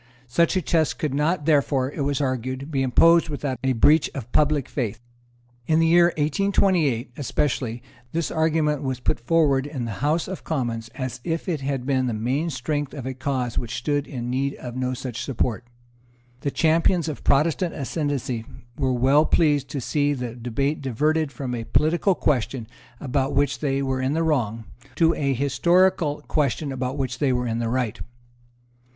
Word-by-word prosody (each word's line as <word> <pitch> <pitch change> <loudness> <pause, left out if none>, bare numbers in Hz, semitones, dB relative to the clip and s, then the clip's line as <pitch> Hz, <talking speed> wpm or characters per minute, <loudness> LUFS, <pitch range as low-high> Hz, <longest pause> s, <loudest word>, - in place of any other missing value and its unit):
Such 170 +9 +2
a 185 - 0
test 160 -4 +1
could 150 -4 -2
not 150 +2 0
therefore, 140 -3 +2
it 145 - -5
was 140 -1 0
argued, 130 +2 -3
be 135 -2 0
imposed 165 +6 +5
without 140 -3 -3
a 130 0 +2
breach 145 +6 +4
of 125 -4 -6
public 150 -3 +2
faith. 115 -5 -3 0.7
In 155 - +3
the 165 - +4
year 170 +1 +6
1828, 155 - +1
especially, 125 -4 -1 0.3
this 165 0 -2
argument 160 -2 +1
was 130 -3 -2
put 125 - 0
forward 140 +1 +2
in 135 -5 -4
the 115 0 -6
House 155 +3 +1
of 190 0 -6
Commons 120 -7 -2
as 130 -2 -5
if 165 +2 -3
it 160 -6 -1
had 135 -2 -2
been 130 -2 +1
the 120 - -1
main 130 +9 -1
strength 145 0 -3
of 135 -4 -6
a 130 - -3
cause 130 -2 -2
which 120 0 -5
stood 145 +3 -1
in 120 -3 -4
need 135 +2 -1
of 120 -1 -8
no 130 0 -1
such 120 -2 -5
support. 120 -2 -2 0.7
The 140 - -1
champions 165 +3 +2
of 155 - -5
Protestant 160 +5 +2
ascendency 140 -5 -2 0.4
were 130 -2 +1
well 135 +5 +4
pleased 145 -5 +2
to 140 - -3
see 145 +3 0
the 125 -4 -4
debate 125 +5 -2
diverted 150 +4 0
from 130 -3 -5
a 115 -1 -3
political 170 - +2
question 130 -5 0 0.3
about 135 0 -1
which 140 0 +1
they 140 -2 0
were 130 -1 -1
in 130 +2 0
the 165 +1 +1
wrong, 115 -8 0 0.3
to 165 +1 +4
a 140 -2 0
historical 150 +3 +2
question 145 -1 0
about 130 +1 -3
which 130 -2 -3
they 140 -3 +2
were 125 0 0
in 115 -1 -1
the 115 -1 -1
right. 125 -3 -1
140 Hz, 180 wpm, -24 LUFS, 125-155 Hz, 0.7 s, year